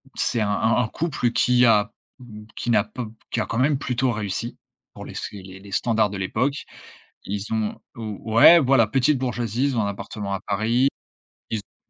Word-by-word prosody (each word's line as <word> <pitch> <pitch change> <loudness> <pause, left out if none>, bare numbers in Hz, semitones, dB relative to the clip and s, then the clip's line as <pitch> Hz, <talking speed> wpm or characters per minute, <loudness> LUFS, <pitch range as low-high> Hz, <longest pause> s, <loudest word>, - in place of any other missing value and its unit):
c'est 115 - 0
un 105 - 0
un 110 +2 +2
un - - -2
couple 135 -3 -1
qui 125 +1 +3
a 105 -2 +4 0.3
m 105 -4 -11
qui - - -4
n'a 110 -3 +4
pas 115 +3 -7
p 110 - -11 0.2
qui - - -1
a - - -1
quand 115 - -4
même 140 +3 +2
plutôt 130 -1 0
réussi 110 +2 -4 0.4
pour - - -9
les - - -10
sé 100 - -6
les 95 +1 -12
standards 110 0 +1
de 100 - -6
l'époque. 125 +9 -1 0.6
Ils 100 +1 -4
ont 110 -1 -2 0.2
ou 110 -1 -6
ouais 170 +9 +9
voilà, 130 -6 +4
petite 135 +5 +2
bourgeoisie, 120 -1 -1
ils 135 -4 0
ont - - +3
un - - -1
appartement 100 0 -5
à 95 - -2
Paris. 110 +6 +2 0.6
Ils 110 - -1
ont 100 - -14
115 Hz, 200 wpm, -23 LUFS, 105-125 Hz, 0.6 s, ouais